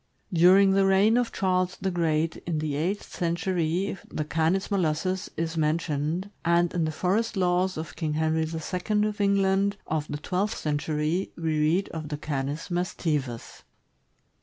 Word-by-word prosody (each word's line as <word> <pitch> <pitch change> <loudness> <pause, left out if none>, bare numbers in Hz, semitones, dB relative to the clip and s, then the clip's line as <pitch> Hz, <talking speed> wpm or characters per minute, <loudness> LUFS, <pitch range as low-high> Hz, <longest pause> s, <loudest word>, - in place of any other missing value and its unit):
During 185 +3 +6
the 195 0 +4
reign 195 +4 +4
of 245 -1 +1
Charles 185 -1 0
the 190 - -1
Great, 165 -2 0
in 165 -3 0
the 155 -1 -2
eighth 180 +8 -2
century, 175 +2 -1
the 155 - -3
Canis 165 +5 0
molossus 185 0 0
is 165 0 -2
mentioned, 160 +3 -1
and 170 0 +2
in 170 -3 +1
the 155 - -1
for 180 +5 +1
est 225 -2 -2
laws 180 0 +1
of 160 +1 -6
King 155 -3 -2
Henry 160 +1 +1
II. 180 +6 -1
of 210 -1 -4
England, 200 0 +2
of 155 -1 -2
the 145 - -4
twelfth 185 +7 -1
century, 150 +4 -1
we 160 -2 -1
read 165 +6 +2
of 155 -2 -6
the 150 - -3
Canis 145 +1 -3
mastivus. 155 -8 -2
170 Hz, 160 wpm, -26 LUFS, 155-190 Hz, -, During